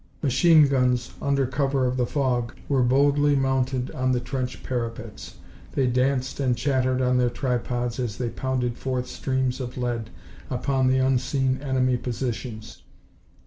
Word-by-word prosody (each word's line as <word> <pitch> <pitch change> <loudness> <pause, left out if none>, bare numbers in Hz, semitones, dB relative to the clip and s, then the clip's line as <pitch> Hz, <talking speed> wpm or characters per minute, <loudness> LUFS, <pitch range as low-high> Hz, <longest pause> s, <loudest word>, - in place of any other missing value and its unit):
Machine 155 +2 +5
guns, 125 -3 +1
under 140 -1 +1
cover 135 +1 0
of 125 0 0
the 125 -2 0
fog, 125 -4 -1
were 135 -2 +2
boldly 140 +3 +3
mounted 130 -1 0
on 130 0 0
the 125 - +1
trench 125 0 -4
parapets. 115 -3 -5 0.4
They 135 - +2
danced 130 +2 0
and 125 -3 +1
chattered 130 -2 +1
on 125 0 +2
their 125 -1 +3
tripods 120 -1 -2
as 115 -6 -3
they 120 +1 -2
pounded 125 -1 -2
forth 130 -1 -2
streams 130 0 -2
of 125 -1 -6
lead 120 -3 -2 0.4
upon 130 +1 0
the 130 0 +3
unseen 130 0 +1
enemy 130 -2 +1
positions. 120 -2 -5
130 Hz, 145 wpm, -25 LUFS, 125-135 Hz, 0.4 s, Machine